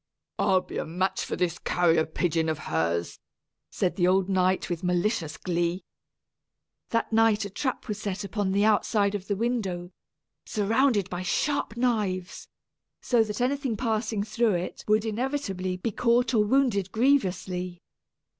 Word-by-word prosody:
"I'll 185 -1 +3
be - - -6
a - - -3
match 185 +4 -1
for - - -3
this 180 -1 -1
carrier 165 -3 +2
pigeon 160 0 0
of 155 - -1 0.2
hers!" 85 +1 -1 0.5
said 180 - -1
the 175 -2 +3
old 190 +1 +2
knight 185 -1 +2
with 175 -1 -4
malicious 180 -2 0
glee. 175 0 -1 1.1
That 230 -1 -1
night 220 -2 +4
a 200 - -7
trap 260 +5 -3
was 210 -1 -4
set 205 0 -3
upon 200 -1 -2
the 200 +2 +3
outside 210 -1 +2
of 200 -2 -4
the 205 - 0
window, 195 -6 -2 0.5
surrounded 220 0 +1
by 175 0 -3
sharp 235 +5 -1
knives, 210 -7 -1 0.5
so 240 -3 +3
that 210 +2 -4
anything 260 -2 0
passing 220 -3 -1
through 215 -1 +1
it 175 +1 -4
would 215 +1 +3
inevitably 215 -6 -2
be 220 +5 -2
caught 240 +2 +2
or 215 -3 +4
wounded 210 -5 +1
grievously. 185 -8 0
200 Hz, 150 wpm, -27 LUFS, 180-225 Hz, 1.1 s, night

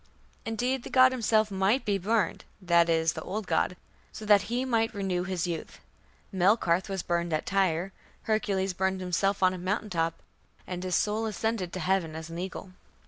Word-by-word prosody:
Indeed 245 +4 -1
the - - -9
god 255 0 +6
himself 220 -4 +2
might 195 +7 +1
be 200 -2 +1
burned 205 0 0 0.2
(that 170 -2 +3
is, 160 -1 +2
the 160 - -6
old 200 +5 -4
god), 180 - 0 0.3
so 215 - -8
that 205 -1 +6
he 245 +2 0
might 225 -3 0
renew 185 -3 -1
his 185 -2 -2
youth. 170 -3 -5 0.5
Melkarth 185 -1 +2
was 195 -2 -3
burned 170 0 -1
at 155 - -1
Tyre. 190 -1 0 0.3
Hercules 200 -4 0
burned 190 +1 0
himself 190 +2 0
on 185 0 +5
a 185 - -6
mountain 205 +3 -2
top, 165 -1 -1 0.4
and 180 0 -5
his 185 -2 0
soul 215 +1 0
ascended 215 -3 -2
to 185 - -4
heaven 180 -2 0
as 160 +1 -7
an 170 - -5
eagle. 185 +1 -6
190 Hz, 185 wpm, -28 LUFS, 175-215 Hz, 0.5 s, god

